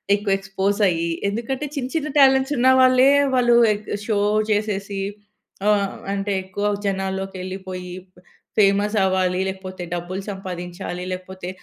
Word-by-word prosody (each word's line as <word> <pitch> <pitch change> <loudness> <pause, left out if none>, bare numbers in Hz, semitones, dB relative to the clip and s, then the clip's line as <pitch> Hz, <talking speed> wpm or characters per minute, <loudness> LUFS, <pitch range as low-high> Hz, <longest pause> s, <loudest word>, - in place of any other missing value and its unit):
ఎక్కువ 205 -1 -1
ఎక్స్‌పోజ్ 195 +1 -1
అయ్యి, 170 0 -1 0.2
ఎందుకంటే 235 +7 -3
చిన్న 265 -3 -2
చిన్న 305 -2 -1
టాలెంట్సున్నా 265 -1 +4
వాళ్లే 255 0 +6 0.3
వాళ్ళు 240 -2 +4 0.2
ఏక్ 210 +1 -8 0.2
షో 215 -3 +1 0.3
చేసేసి 205 -1 -1 0.7
ఆహ్, 200 -2 +2 0.2
అంటే 200 0 -2
ఎక్కువ 190 +2 -4 0.2
జనాల్లోకి 195 0 -2
ఎళ్ళిపోయి 185 -1 -6 0.2
బ - - -18 0.4
ఫేమస్ 205 +1 +3
అవ్వాలి, 185 -1 +1
లేకపోతే 190 -1 -6
డబ్బులు 175 +2 -4
సంపాదించాలి 180 -1 -6
లేకపోతే 185 0 -6
195 Hz, 125 wpm, -22 LUFS, 185-215 Hz, 0.7 s, వాళ్లే